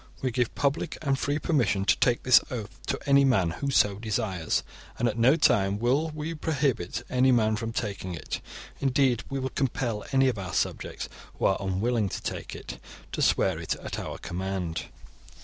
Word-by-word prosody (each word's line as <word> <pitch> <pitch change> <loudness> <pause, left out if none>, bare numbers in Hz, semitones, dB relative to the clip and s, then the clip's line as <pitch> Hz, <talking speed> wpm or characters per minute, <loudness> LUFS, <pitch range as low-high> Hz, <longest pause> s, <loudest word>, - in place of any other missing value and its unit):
We 130 - +1
give 120 -1 0
public 140 +1 0
and 135 -2 +1
free 145 +1 0
permission 110 - +1
to 85 -5 +5
take 120 -1 +2
this 125 -2 +7
oath 115 -4 -6
to - - 0
any 140 -1 +5
man 100 -11 +3
who 140 +11 -3
so 105 -6 +3
desires, 95 -6 -1 0.3
and 120 - +1
at 110 - -1
no 120 +5 +5
time 100 -11 +3
will 130 +8 +1
we 155 +2 -3
prohibit 140 - -1
any 130 +1 +3
man 110 -3 +3
from 115 +1 -3
taking 100 -5 -3
it. 80 - -5 0.4
Indeed, 130 -3 +2
we 135 - -2
will 130 0 -2
compel 120 -6 -1
any 135 -1 +4
of 120 -6 0
our 90 -2 -5
subjects - - -2 0.3
who - - -1
are 95 - +3
unwilling 100 +3 0
to - - -5
take - - -4
it - - -8 0.3
to - - -3
swear - - +2
it - - -2
at - - -6
our - - -5
command. 90 -2 -3
120 Hz, 185 wpm, -27 LUFS, 100-135 Hz, 0.4 s, this